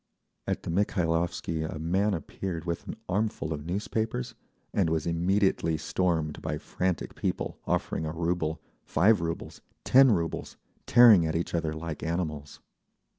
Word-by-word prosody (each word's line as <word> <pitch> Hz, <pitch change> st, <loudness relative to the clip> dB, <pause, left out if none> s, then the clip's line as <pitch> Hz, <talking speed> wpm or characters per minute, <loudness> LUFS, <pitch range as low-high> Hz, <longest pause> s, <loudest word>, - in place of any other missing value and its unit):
At -, -, -2 dB
the -, -, -3 dB
Mikhailovsky 85 Hz, -3 st, 0 dB
a 80 Hz, -, -4 dB
man 95 Hz, +6 st, +1 dB
appeared 85 Hz, +1 st, -5 dB
with 85 Hz, -1 st, -3 dB
an -, -, -5 dB
armful 100 Hz, -4 st, -1 dB
of 75 Hz, -1 st, -5 dB
newspapers, 105 Hz, -, -2 dB, 0.4 s
and 95 Hz, -5 st, +2 dB
was 80 Hz, -2 st, 0 dB
immediately 85 Hz, -1 st, +1 dB
stormed 80 Hz, -3 st, -1 dB
by -, -, -2 dB
frantic 90 Hz, -1 st, -2 dB
people, -, -, -3 dB
offering 80 Hz, -, -1 dB
a -, -, -2 dB
rouble, 85 Hz, -1 st, -1 dB, 0.2 s
five 100 Hz, +4 st, +3 dB
roubles, 85 Hz, 0 st, -4 dB, 0.2 s
ten 135 Hz, +1 st, +7 dB
roubles, 85 Hz, -5 st, -2 dB, 0.3 s
tearing 110 Hz, -8 st, +7 dB
at 80 Hz, -, -2 dB
each 85 Hz, -, -2 dB
other 80 Hz, -2 st, 0 dB
like 80 Hz, 0 st, -5 dB
animals. 80 Hz, -4 st, -3 dB
85 Hz, 140 wpm, -28 LUFS, 80-95 Hz, 0.4 s, ten